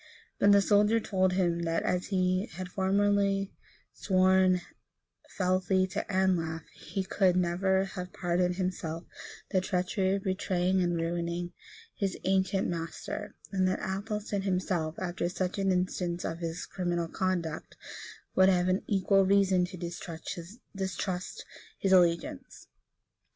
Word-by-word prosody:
But 200 Hz, -, +6 dB
the 200 Hz, 0 st, +6 dB
soldier 210 Hz, +3 st, +4 dB
told 190 Hz, -4 st, +1 dB
him, 175 Hz, -2 st, +1 dB
that, 165 Hz, -1 st, 0 dB
as 180 Hz, 0 st, 0 dB
he 185 Hz, +1 st, +1 dB
had 185 Hz, +2 st, -6 dB
formerly 195 Hz, +1 st, +1 dB, 0.4 s
sworn 185 Hz, -1 st, +3 dB, 0.8 s
fealty 185 Hz, 0 st, +2 dB
to -, -, -2 dB
Anlaf, 175 Hz, -4 st, +1 dB
he 195 Hz, -, -4 dB
could 190 Hz, -1 st, +2 dB
never 185 Hz, +2 st, +2 dB
have 180 Hz, -1 st, -6 dB
pardoned 180 Hz, 0 st, 0 dB
himself 180 Hz, -3 st, -3 dB, 0.5 s
the 185 Hz, -, +3 dB
treachery 190 Hz, +1 st, 0 dB
of 195 Hz, -, -4 dB
betraying 185 Hz, -1 st, +1 dB
and 175 Hz, -1 st, +1 dB
ruining 170 Hz, +1 st, -2 dB, 0.4 s
his 195 Hz, -3 st, -2 dB
ancient 190 Hz, 0 st, +1 dB
master; 165 Hz, -1 st, -5 dB, 0.2 s
and 190 Hz, -2 st, +2 dB
that 185 Hz, -, +1 dB
Athelstan 205 Hz, +1 st, -3 dB
himself, 180 Hz, -4 st, -1 dB
after 175 Hz, -1 st, -2 dB
such 185 Hz, +1 st, -2 dB
an 195 Hz, -1 st, +2 dB
instance 180 Hz, -1 st, -1 dB
of 165 Hz, 0 st, -3 dB
his 165 Hz, 0 st, -4 dB
criminal 175 Hz, -2 st, -2 dB
conduct, 170 Hz, -3 st, -2 dB, 0.6 s
would 190 Hz, 0 st, +5 dB
have 180 Hz, -2 st, +3 dB
had 185 Hz, +1 st, +1 dB
equal 195 Hz, 0 st, +3 dB
reason 190 Hz, -2 st, +3 dB
to 180 Hz, +1 st, -9 dB
distrust 180 Hz, +2 st, -5 dB, 0.3 s
his 195 Hz, -, 0 dB
allegiance. 175 Hz, -3 st, +2 dB
185 Hz, 130 wpm, -30 LUFS, 175-195 Hz, 0.8 s, But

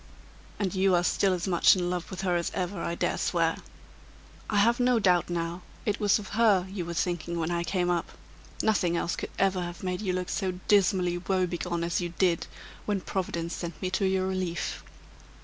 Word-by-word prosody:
"And 195 Hz, -3 st, -1 dB
you 190 Hz, -1 st, +3 dB
are 175 Hz, -, +2 dB
still 195 Hz, +2 st, +2 dB
as 180 Hz, 0 st, -1 dB
much 175 Hz, 0 st, +5 dB
in 180 Hz, -1 st, -1 dB
love 180 Hz, -1 st, -3 dB
with 185 Hz, -, -5 dB
her 180 Hz, -2 st, +1 dB
as 170 Hz, -1 st, 0 dB
ever, 180 Hz, -1 st, -2 dB
I 170 Hz, -, -2 dB
dare -, -, -1 dB
swear! -, -, +1 dB, 0.9 s
I -, -, -1 dB
have 235 Hz, +4 st, +4 dB
no 250 Hz, -1 st, +4 dB
doubt, 180 Hz, -5 st, +3 dB
now, 170 Hz, +1 st, -2 dB, 0.2 s
it 210 Hz, -1 st, 0 dB
was 205 Hz, -2 st, +4 dB
of 205 Hz, -3 st, -8 dB
her 215 Hz, -5 st, +3 dB
you 190 Hz, -3 st, -4 dB
were 170 Hz, 0 st, -5 dB
thinking 170 Hz, -1 st, -1 dB
when 165 Hz, 0 st, -1 dB
I 170 Hz, 0 st, 0 dB
came 180 Hz, +1 st, 0 dB
up. 170 Hz, -1 st, -1 dB, 0.5 s
Nothing 185 Hz, -6 st, +2 dB
else 170 Hz, -, -1 dB
could -, -, -5 dB
ever 190 Hz, -1 st, +2 dB
have 175 Hz, +1 st, -6 dB
made 180 Hz, 0 st, -2 dB
you 190 Hz, -4 st, -1 dB
look 180 Hz, 0 st, -2 dB
so 190 Hz, -3 st, -1 dB
dismally 185 Hz, -3 st, +3 dB
woebegone 180 Hz, -2 st, -1 dB
as 170 Hz, +1 st, 0 dB
you 175 Hz, -1 st, -4 dB
did, 175 Hz, -3 st, +2 dB, 0.4 s
when 205 Hz, -2 st, 0 dB
Providence 170 Hz, -3 st, -3 dB
sent 170 Hz, -2 st, -6 dB
me 185 Hz, -1 st, -2 dB
to 195 Hz, +1 st, +1 dB
your 190 Hz, 0 st, +1 dB
relief." 185 Hz, -3 st, -2 dB
180 Hz, 200 wpm, -28 LUFS, 175-195 Hz, 0.9 s, much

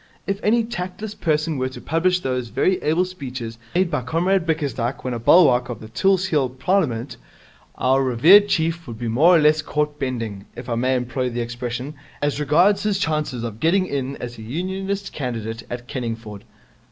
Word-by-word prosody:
If 195 Hz, 0 st, -2 dB
any 230 Hz, +2 st, +3 dB
tactless 210 Hz, 0 st, -5 dB
person 155 Hz, -4 st, 0 dB
were 130 Hz, 0 st, 0 dB
to 130 Hz, -, -10 dB
publish 180 Hz, +3 st, +1 dB
those 125 Hz, -3 st, -2 dB
very 185 Hz, +10 st, +1 dB
able 160 Hz, +4 st, +2 dB
speeches 130 Hz, -10 st, -7 dB, 0.2 s
made 180 Hz, -1 st, +2 dB
by 150 Hz, -, 0 dB
Comrade 170 Hz, +6 st, 0 dB
Bickersdyke 140 Hz, -6 st, -1 dB
when 125 Hz, -, -2 dB
a 120 Hz, -, -3 dB
bulwark 125 Hz, -2 st, +5 dB
of 120 Hz, -, -5 dB
the 110 Hz, -, -11 dB
Tulse 190 Hz, +9 st, +2 dB
Hill 150 Hz, -8 st, +1 dB
Parliament, 130 Hz, -4 st, -1 dB, 0.6 s
our 130 Hz, +2 st, +2 dB
revered 160 Hz, -, +6 dB
chief 165 Hz, -3 st, 0 dB
would 115 Hz, -2 st, -7 dB
be 120 Hz, +1 st, -4 dB
more 155 Hz, +11 st, +5 dB
or -, -, +6 dB
less 155 Hz, +1 st, +4 dB
caught 150 Hz, -1 st, -2 dB
bending, 115 Hz, -6 st, -4 dB
if 120 Hz, +1 st, -8 dB
I 120 Hz, -, -1 dB
may 130 Hz, +3 st, +1 dB
employ 125 Hz, +1 st, -1 dB
the 120 Hz, 0 st, -3 dB
expression, 120 Hz, +3 st, -4 dB, 0.3 s
as 145 Hz, 0 st, -1 dB
regards 170 Hz, +8 st, +3 dB
his 210 Hz, -2 st, 0 dB
chances 150 Hz, -8 st, -1 dB
of 115 Hz, -2 st, -5 dB
getting 185 Hz, +7 st, +3 dB
in 140 Hz, -4 st, -3 dB
as 120 Hz, -2 st, -7 dB
Unionist 190 Hz, -, -4 dB
candidate 115 Hz, -4 st, -4 dB
at 120 Hz, 0 st, -6 dB
Kenningford. 115 Hz, -5 st, -5 dB
140 Hz, 180 wpm, -22 LUFS, 120-175 Hz, 0.6 s, revered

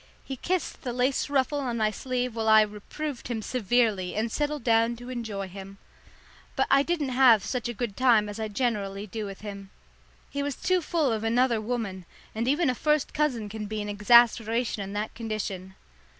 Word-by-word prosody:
He 270 Hz, -, -5 dB
kissed 360 Hz, +7 st, -2 dB
the 245 Hz, -3 st, -4 dB
lace 255 Hz, +3 st, 0 dB
ruffle 285 Hz, +1 st, +1 dB
on 245 Hz, -4 st, -2 dB
my 215 Hz, -1 st, +2 dB
sleeve 250 Hz, +2 st, -2 dB
while 220 Hz, -1 st, 0 dB
I 220 Hz, 0 st, +8 dB
reproved 235 Hz, +7 st, -6 dB
him 230 Hz, -3 st, -3 dB
severely 220 Hz, -6 st, +1 dB
and 220 Hz, +2 st, -1 dB
settled 295 Hz, -1 st, -2 dB
down 230 Hz, 0 st, +3 dB
to 245 Hz, +1 st, -10 dB
enjoy 220 Hz, -5 st, -4 dB
him. 195 Hz, +1 st, -10 dB, 0.8 s
But 265 Hz, -, +2 dB
I 275 Hz, 0 st, +6 dB
didn't 305 Hz, -2 st, -1 dB
have 250 Hz, -5 st, +5 dB
such 245 Hz, -2 st, -2 dB
a -, -, -3 dB
good 210 Hz, -2 st, -3 dB
time 235 Hz, -5 st, +4 dB
as 205 Hz, +1 st, -7 dB
I 220 Hz, -, -2 dB
generally 205 Hz, -3 st, -2 dB
do 215 Hz, +1 st, -5 dB
with 195 Hz, -1 st, -9 dB
him. 200 Hz, -2 st, -8 dB, 0.6 s
He 280 Hz, -, -2 dB
was 285 Hz, -2 st, -2 dB
too 370 Hz, -1 st, +1 dB
full 315 Hz, -5 st, 0 dB
of 220 Hz, -1 st, -2 dB
another 235 Hz, 0 st, +2 dB
woman, 210 Hz, -6 st, -4 dB, 0.3 s
and 230 Hz, +2 st, -2 dB
even 295 Hz, +5 st, +2 dB
a 255 Hz, -, +2 dB
first 300 Hz, +3 st, 0 dB
cousin 260 Hz, -8 st, 0 dB
can 210 Hz, 0 st, -6 dB
be 215 Hz, +1 st, -4 dB
an 205 Hz, 0 st, -4 dB
exasperation 230 Hz, +1 st, +4 dB
in 195 Hz, 0 st, -6 dB
that 210 Hz, +1 st, -3 dB
condition. 200 Hz, -4 st, -5 dB
230 Hz, 195 wpm, -27 LUFS, 210-260 Hz, 0.8 s, I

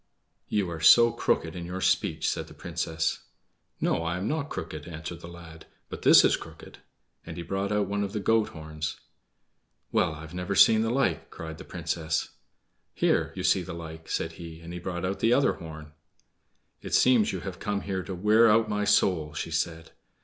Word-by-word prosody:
"You 100 Hz, -3 st, 0 dB
are 80 Hz, -, -5 dB
so 115 Hz, +8 st, +7 dB
crooked 80 Hz, -6 st, -1 dB
in 90 Hz, -, -5 dB
your 90 Hz, +2 st, -5 dB
speech," -, -, +1 dB
said -, -, -2 dB
the -, -, -14 dB
Princess. 80 Hz, 0 st, -2 dB, 0.6 s
"No, -, -, +1 dB
I 85 Hz, +1 st, -2 dB
am 95 Hz, +3 st, -3 dB
not 150 Hz, +1 st, -2 dB
crooked," 80 Hz, 0 st, -6 dB
answered 80 Hz, 0 st, -7 dB
the -, -, -9 dB
lad; 85 Hz, -2 st, -12 dB, 0.2 s
"but -, -, -7 dB
this -, -, +8 dB
is -, -, +4 dB
crooked"; -, -, -12 dB, 0.4 s
and -, -, -8 dB
he 85 Hz, -, -4 dB
brought 95 Hz, +3 st, -2 dB
out 105 Hz, -1 st, +1 dB
one 100 Hz, +1 st, -1 dB
of 100 Hz, -, -3 dB
the 105 Hz, -, -3 dB
goat 110 Hz, +1 st, +2 dB
horns. 80 Hz, -1 st, -6 dB, 0.9 s
"Well, 80 Hz, -, +1 dB
I've 80 Hz, +2 st, -10 dB
never 90 Hz, +2 st, -3 dB
seen 110 Hz, +3 st, +7 dB
the 115 Hz, -, 0 dB
like!" 130 Hz, +2 st, 0 dB
cried 80 Hz, 0 st, -8 dB
the 95 Hz, -, -9 dB
Princess. 80 Hz, -2 st, -2 dB, 0.7 s
"Here -, -, +1 dB
you 95 Hz, -, -4 dB
see 95 Hz, +1 st, +3 dB
the 85 Hz, -, -7 dB
like," 80 Hz, -1 st, -9 dB
said 80 Hz, -, -1 dB
he, 80 Hz, -1 st, -10 dB
and 85 Hz, +1 st, -8 dB
brought 90 Hz, 0 st, -4 dB
out 95 Hz, +2 st, -2 dB
the 115 Hz, +1 st, +3 dB
other 140 Hz, -, +3 dB
horn. 80 Hz, -2 st, -10 dB, 0.9 s
"It -, -, -1 dB
seems 125 Hz, -4 st, +4 dB
you 95 Hz, -, -4 dB
have 95 Hz, -1 st, -7 dB
come 105 Hz, -1 st, -2 dB
here 95 Hz, -1 st, -3 dB
to 95 Hz, +1 st, -6 dB
wear 105 Hz, +5 st, +5 dB
out 110 Hz, +1 st, +4 dB
my 105 Hz, -1 st, -1 dB
soul!" 90 Hz, -7 st, +2 dB
she 80 Hz, -, -4 dB
said. 80 Hz, 0 st, -2 dB
90 Hz, 195 wpm, -27 LUFS, 80-105 Hz, 0.9 s, this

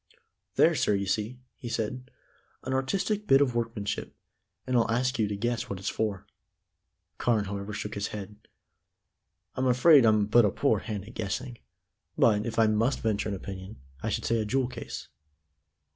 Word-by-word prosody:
"There, -, -, +5 dB
sir, 105 Hz, -, +2 dB
you 100 Hz, 0 st, -1 dB
see," 105 Hz, +5 st, -1 dB, 0.2 s
he 120 Hz, -, -7 dB
said, 125 Hz, +3 st, -3 dB, 0.5 s
"an 130 Hz, -, -3 dB
artistic 195 Hz, +10 st, -1 dB
bit 135 Hz, -, +6 dB
of 140 Hz, -4 st, +2 dB
workmanship, 115 Hz, -3 st, -3 dB, 0.5 s
and 130 Hz, -, -1 dB
I'll 115 Hz, -2 st, +3 dB
ask 125 Hz, +2 st, 0 dB
you 110 Hz, -, +2 dB
to 100 Hz, -, -3 dB
guess 120 Hz, +2 st, -2 dB
what 100 Hz, -, -3 dB
it's 95 Hz, -, -3 dB
for." 105 Hz, -4 st, -2 dB, 0.9 s
Carne, 110 Hz, -4 st, +2 dB
however, 100 Hz, +1 st, -5 dB
shook 105 Hz, 0 st, -5 dB
his 100 Hz, 0 st, -2 dB
head. 105 Hz, 0 st, -7 dB, 1.2 s
"I'm 130 Hz, 0 st, 0 dB
afraid 130 Hz, +3 st, +6 dB
I'm 110 Hz, -2 st, +4 dB
but 115 Hz, +3 st, +5 dB
a 105 Hz, -, +4 dB
poor -, -, +1 dB
hand 105 Hz, -2 st, -5 dB
at 115 Hz, -, -11 dB
guessing, 115 Hz, +4 st, -4 dB, 0.6 s
but, 105 Hz, 0 st, +3 dB
if 115 Hz, -, -4 dB
I 115 Hz, -, +5 dB
must 110 Hz, +5 st, +1 dB
venture 110 Hz, -1 st, 0 dB
an 100 Hz, -, -2 dB
opinion, 95 Hz, +2 st, -8 dB, 0.2 s
I -, -, -2 dB
should -, -, -2 dB
say 115 Hz, 0 st, +1 dB
a 110 Hz, -, -1 dB
jewel 130 Hz, +3 st, 0 dB
case." -, -, -7 dB
110 Hz, 175 wpm, -28 LUFS, 105-125 Hz, 1.2 s, bit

